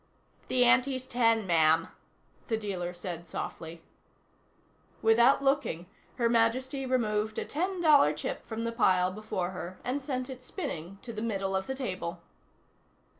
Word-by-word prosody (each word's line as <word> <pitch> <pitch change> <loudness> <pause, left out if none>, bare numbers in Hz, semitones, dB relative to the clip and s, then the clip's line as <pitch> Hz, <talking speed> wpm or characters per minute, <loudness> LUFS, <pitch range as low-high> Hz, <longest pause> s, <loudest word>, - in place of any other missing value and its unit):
"The 250 -1 +4
ante's 255 +1 +3
ten, 230 -4 +2
ma'am," 165 -1 +3 0.6
the 225 - 0
dealer 190 -5 -3
said 175 -1 -7
softly. 165 +1 -6 1.2
Without 235 +5 +5
looking, 270 - +1 0.3
Her 235 -2 +2
Majesty 255 +4 +1
removed 215 -4 0
a - - -2
ten 360 +4 -2
dollar 295 - +6
chip 150 +1 -4
from 225 0 -4
the 230 - -1
pile 185 -6 +3
before 190 -3 -3
her 185 0 -7
and 265 +3 -2
sent 255 -2 -3
it 260 -2 -8
spinning 195 - -5
to 235 - -7
the 215 - -5
middle 195 -4 -1
of 190 - -1
the 265 - -3
table. 185 -9 -4
225 Hz, 145 wpm, -29 LUFS, 185-255 Hz, 1.2 s, dollar